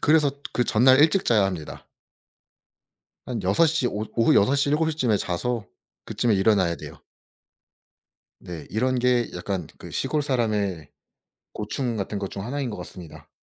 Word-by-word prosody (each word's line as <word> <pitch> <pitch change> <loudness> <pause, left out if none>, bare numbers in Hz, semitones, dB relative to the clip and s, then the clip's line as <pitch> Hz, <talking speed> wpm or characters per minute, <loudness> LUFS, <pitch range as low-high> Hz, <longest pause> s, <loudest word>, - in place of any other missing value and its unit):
그래서 150 -1 +4 0.2
그 125 - +1
전날 130 +4 +5
일찍 165 +5 +4
자야 110 -4 +3
합니다. 90 -6 -5 1.4
한 120 -3 -3
6 100 - +4
시 160 -5 +1
오 105 -2 -2
오후 115 -1 +4
6 115 +8 +4
시 140 0 +1
7 155 +2 +2
시 155 - -6
쯤에 120 -8 +2
자서 105 +5 -2 0.4
그쯤에 115 -3 0
일어나야 95 -4 +3
돼요. - - -11 1.4
네. 85 -4 -8
이런 130 +3 0
게 125 -1 +2
약간 90 -1 -3
그 - - -10
시골 150 -1 -1
사람의 105 - -1 0.6
고충 115 +3 -3
같은 100 +1 -3
것 100 -1 -4
중 100 - -6
하나인 135 +2 -3
것 105 - -6
같습니다. 85 -4 -10
115 Hz, 265 characters per minute, -24 LUFS, 100-130 Hz, 1.4 s, 전날